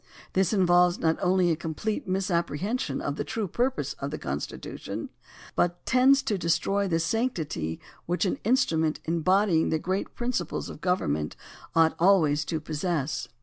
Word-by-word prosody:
This 190 -2 +2
involves 180 -3 +4
not 160 0 +1
only 180 -1 +3
a - - +2
complete 170 +7 -3
misapprehension 185 - -1
of 145 +1 -3
the - - -1
true 220 -3 -3
purposes 185 - -1
of 140 - -3
the 155 - -4
Constitu 70 +2 -5
tion, - - -5 0.5
but 175 0 0
tends 260 +2 +5
to 215 -8 -1
destroy 195 +4 +1
the 165 -3 +1
sanctity 165 - -1 0.3
which 175 +4 +1
an 185 - -1
in 235 +5 +4
strument 160 - +1
embodying 170 +1 +2
great 185 +5 -1
general - - -35
principles 245 0 -2
of - - -11
govern 180 - +1
ment 75 0 -3 0.4
ought 165 -1 +5
always 165 -5 +4
to 160 - -2
possess. 155 -1 -2
175 Hz, 160 wpm, -27 LUFS, 160-200 Hz, 0.5 s, tends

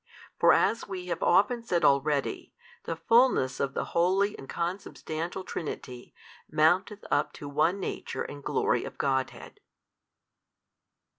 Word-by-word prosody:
For - - +6
as 230 - +2
we 185 -2 -6
have 170 - -8
often 235 +4 +3
said 180 -7 0
already, 140 0 +1 0.3
the 165 - -3
Fullness 230 - +3
of 140 -1 -2
the - - -1
Holy 190 +4 +2
and 135 - -11
Consubstantial 170 0 -4
Trinity 125 -8 -6 0.4
mounteth 180 +7 +2
up 145 - +1
to 145 - -8
One 155 +7 +1
Nature - - -4
and 145 0 -9
glory - - +1
of - - -8
Godhead. 130 -2 -2
170 Hz, 130 wpm, -28 LUFS, 145-195 Hz, 0.4 s, For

